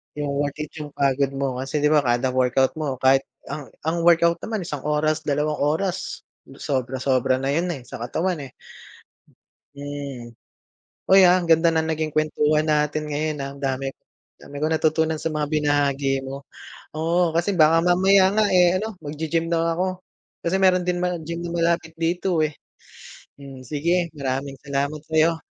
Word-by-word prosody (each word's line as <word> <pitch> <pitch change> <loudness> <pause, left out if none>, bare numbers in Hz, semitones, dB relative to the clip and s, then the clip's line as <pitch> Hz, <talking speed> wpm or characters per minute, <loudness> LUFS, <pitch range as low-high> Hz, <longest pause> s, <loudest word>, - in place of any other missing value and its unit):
Yung 145 -1 -3
worth 145 -1 -1
it 150 - -10
yung 150 -1 -8
pagod 140 0 +2
mo, 135 -2 -2
kasi 145 +3 -2
di 150 - +4
ba, 150 - +5
kada 125 0 +1
workout 130 +1 +2
mo, 145 -4 -2
kahit 135 +1 +4 0.2
ang 145 -3 -6 0.2
ang 165 +2 -1
workout 170 0 +4
naman 220 -4 -4
isang 150 -3 -5
oras, 155 +1 +1
dalawang 150 +1 0
oras, 160 +6 -1 0.3
sobra-sobra 130 0 0
na 135 +1 -2
yun 170 +5 0
eh, 130 - -11
sa 125 - -9
katawan, 160 +8 -2
eh. 125 - -21 1.2
Hmm, 140 -5 -7 0.8
uy 190 -2 +8
ah, 180 - +6
ang 180 - -1
ganda 165 0 +4
ng 160 0 +1
naging 155 0 -2
kuwentuhan 155 0 +2
natin 150 0 0
ngayon 155 +1 -1
ah, 135 - -5
ang 140 - -13
dami-dami 135 +1 -7
kong 155 - +1
natutunan 160 0 +1
sa - - -1
mga 150 -2 -2
binahagi 140 -2 +1
mo. 135 +1 -6 0.5
Oo, 165 +2 +1
kasi 175 +4 0
baka 160 +1 +5
mamaya 185 +2 +4
nga 215 - +4
eh, 180 0 +5
ano 220 +3 -3
maggi-gym 160 +2 -2
na 165 0 +1
ako, 185 +2 -3 0.4
kasi 190 +3 +1
meron 185 -2 +4
din 180 0 -1 0.2
gym 170 +1 -5
na 175 - -5
malapit 170 -1 -1
dito, 170 0 0
eh. 155 - -2 0.8
Hmm, 135 -3 -11
sige, 170 +4 0
maraming 135 0 -3
salamat 140 +1 -2
sa'yo. 160 +1 +2
155 Hz, 165 wpm, -23 LUFS, 140-170 Hz, 1.2 s, uy